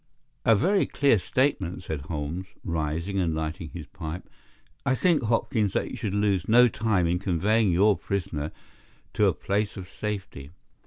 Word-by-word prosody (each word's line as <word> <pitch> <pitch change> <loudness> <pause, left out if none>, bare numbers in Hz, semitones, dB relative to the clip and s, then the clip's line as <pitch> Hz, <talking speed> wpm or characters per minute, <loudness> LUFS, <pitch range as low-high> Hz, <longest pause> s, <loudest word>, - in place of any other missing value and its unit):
"A 115 - +6
very 190 - +2
clear 140 -7 +3
statement 95 -7 0
said 80 -5 -4
Holmes," 75 +4 -4 0.2
rising 85 +3 -2
and 85 -4 0
lighting 80 +1 -4
his 85 -2 -8
pipe. 80 +5 -7 0.6
"I 135 -1 +2
think, 170 +4 +3
Hopkins, 110 -3 +1
that - - -1
you - - -5
should 100 -2 -3
lose 100 -3 +1
no 125 +2 +7
time 105 -5 +1
in 85 +1 +1
conveying 100 +3 +2
your 100 +4 +4
prisoner 80 -7 -3 0.6
to - - +3
a - - +3
place 105 +1 -1
of 95 -1 -7
safety. 100 -9 -5
95 Hz, 160 wpm, -26 LUFS, 85-110 Hz, 0.6 s, no